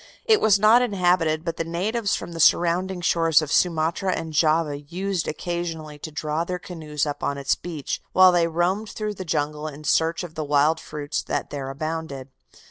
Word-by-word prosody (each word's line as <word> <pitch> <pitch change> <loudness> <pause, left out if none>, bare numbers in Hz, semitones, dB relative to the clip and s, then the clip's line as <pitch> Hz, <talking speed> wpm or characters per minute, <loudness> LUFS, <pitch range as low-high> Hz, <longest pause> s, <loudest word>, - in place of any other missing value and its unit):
It 440 -2 +4
was 210 -2 +5
not 215 +4 +6
inhabited, 175 -7 +1
but 165 -1 -3
the - - -1
natives 200 +6 -1
from - - -6
the 165 - -7
surrounding 175 +3 +3
shores 165 -2 +3
of 155 -2 -4
Sumatra 170 +2 +1
and 160 -1 -5
Java 155 -1 +2
used 180 +4 -3
occasionally 160 -2 -4
to 155 - -7
draw 155 +1 -2
their 180 +1 -3
canoes 155 -4 -4
up 145 -1 -4
on 140 - -1
its 140 0 +1
beach, 160 -5 -5
while 185 0 +7
they 175 -1 +2
roamed 180 +6 -1
through 215 0 -4
the 190 - -7
jungle 150 -1 -2
in 150 0 -9
search 165 +3 +1
of 170 -3 -8
the 155 - -4
wild 150 +2 +2
fruits 150 0 -4
that - - -3
there 140 -2 -4
abounded. 150 -2 -5
165 Hz, 190 wpm, -24 LUFS, 150-180 Hz, -, while